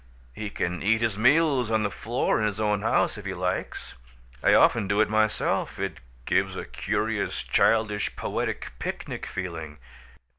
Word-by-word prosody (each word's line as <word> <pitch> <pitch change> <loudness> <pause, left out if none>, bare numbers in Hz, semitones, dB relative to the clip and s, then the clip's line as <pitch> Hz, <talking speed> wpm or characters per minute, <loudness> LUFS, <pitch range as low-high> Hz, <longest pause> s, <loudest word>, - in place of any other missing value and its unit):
He 105 -1 -5
can 90 -3 -3
eat 110 +3 +2
his 110 -3 +1
meals 135 +1 +3
on 110 -1 +2
the 100 - -1
floor 120 +3 0
in 110 - +2
his 105 0 -4
own 105 -1 +1
house 110 - +1
if 105 - -11
he 95 -1 -3
likes. 90 +1 -3 0.5
I - - +5
often 110 -4 +4
do 100 +1 +1
it 110 0 +3
myself; 110 0 +1
it - - -3 0.3
gives - - +1
a - - -5
curious, - - -2
childish, 110 -3 +2
poetic, - - -3
picnic - - -5
feeling. 80 -5 -5
105 Hz, 160 wpm, -26 LUFS, 95-110 Hz, 0.5 s, I